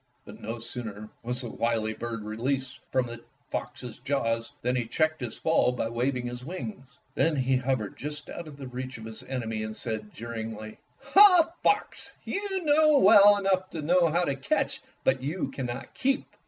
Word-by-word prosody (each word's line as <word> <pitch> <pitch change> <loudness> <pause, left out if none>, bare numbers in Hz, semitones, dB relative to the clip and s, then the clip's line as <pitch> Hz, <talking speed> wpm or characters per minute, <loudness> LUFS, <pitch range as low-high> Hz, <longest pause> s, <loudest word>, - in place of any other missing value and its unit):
But - - -11
no 115 +2 -4
sooner 110 -3 -7
was 125 +2 0
the 120 - -5
wily 115 -2 0
bird 115 -1 -5
released 125 +5 -2
from 130 -1 +2
the 120 0 -8 0.3
fox's 125 -3 -5
jaws 125 -2 -1
than 125 +1 +1
he 120 -3 -1
checked 155 +3 +1
his 120 -3 -5
fall 160 -5 +3
by 115 -2 -2
waving 125 +2 -1
his 120 0 -5
wings. 150 -4 -7 0.2
Then 160 -1 +2
he 130 -1 +2
hovered 125 -5 -1
just 150 0 -6
out 170 - -7
of 145 -2 -11
reach 130 0 -5
of 110 - -9
his 110 -1 -5
enemy 115 -4 -3
and 110 0 -5
said 110 -2 -4
jeeringly, 110 -1 -6 0.4
''Ah, 365 -5 +8
Fox! 410 - 0
you 390 -2 -2
know 305 0 +5
well 205 -2 +8
enough 190 -1 +1
how 170 +2 +2
to 140 -5 0
catch, 135 - 0 0.2
but 130 -1 +2
you 150 +7 -2
cannot 125 -3 -5
keep." 270 +1 0
130 Hz, 170 wpm, -28 LUFS, 115-160 Hz, 0.4 s, Ah